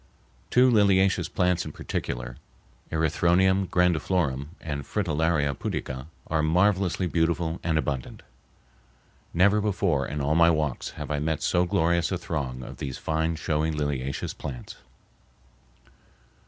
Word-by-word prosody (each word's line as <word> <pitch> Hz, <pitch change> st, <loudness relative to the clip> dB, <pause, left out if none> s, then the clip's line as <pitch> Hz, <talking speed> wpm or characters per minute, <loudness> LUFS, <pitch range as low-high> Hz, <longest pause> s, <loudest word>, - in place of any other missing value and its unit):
Two 125 Hz, +1 st, +5 dB
liliaceous 95 Hz, -4 st, +3 dB
plants 90 Hz, -1 st, +1 dB
in 75 Hz, -, -7 dB
particular, 60 Hz, 0 st, -4 dB, 0.5 s
Erythronium 85 Hz, +4 st, +2 dB
grandiflorum 80 Hz, -5 st, +1 dB
and 70 Hz, -3 st, -4 dB
Fritillaria 80 Hz, -5 st, 0 dB
pudica, 65 Hz, +1 st, -4 dB, 0.2 s
are 80 Hz, -1 st, 0 dB
marvelously 90 Hz, +3 st, +2 dB
beautiful 85 Hz, 0 st, 0 dB
and 80 Hz, -2 st, +1 dB
abundant. 70 Hz, -4 st, -3 dB, 1.1 s
Never 100 Hz, +5 st, +4 dB
before, 95 Hz, -10 st, 0 dB
in 75 Hz, +2 st, -4 dB
all 70 Hz, +2 st, +1 dB
my 85 Hz, +1 st, +5 dB
walks, 75 Hz, -5 st, -1 dB
have -, -, -5 dB
I 75 Hz, -, 0 dB
met 80 Hz, 0 st, -1 dB
so 90 Hz, +4 st, +2 dB
glorious 85 Hz, 0 st, +1 dB
a 95 Hz, -, 0 dB
throng 70 Hz, -7 st, -4 dB
of -, -, -9 dB
these 65 Hz, -2 st, -5 dB
fine 80 Hz, +1 st, -1 dB
showy 80 Hz, 0 st, -1 dB
liliaceous 70 Hz, -3 st, -2 dB
plants. 60 Hz, -3 st, -7 dB
80 Hz, 125 wpm, -26 LUFS, 75-90 Hz, 1.1 s, Two